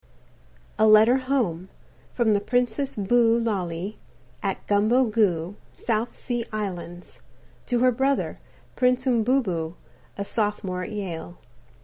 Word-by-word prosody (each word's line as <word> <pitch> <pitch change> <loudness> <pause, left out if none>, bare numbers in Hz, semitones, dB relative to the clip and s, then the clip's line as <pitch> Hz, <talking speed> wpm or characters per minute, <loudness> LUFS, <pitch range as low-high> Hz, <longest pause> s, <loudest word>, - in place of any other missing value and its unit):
A 220 - +5
LETTER 220 +4 +6
FROM 255 - -11
HOME 190 -10 0 0.5
_From 230 -3 +3
the 205 - +3
Princess 245 +4 0
Boo 230 +3 +3
Lally, 195 -3 -3 0.4
at 195 -1 -3
Gumbo 215 +6 +3
Goo, 205 -5 0 0.2
South 230 0 -2
Sea 240 -2 -2
Islands, 180 -4 -6 0.5
to 245 -2 +1
Her 255 0 +5
Brother, 270 +3 0 0.4
Prince 250 +1 +2
Umbobo, 220 -9 +1 0.4
a 200 - -3
Sophomore 205 -4 -2
at 180 - -6
Yale. 175 -4 -5
215 Hz, 120 wpm, -25 LUFS, 190-245 Hz, 0.5 s, LETTER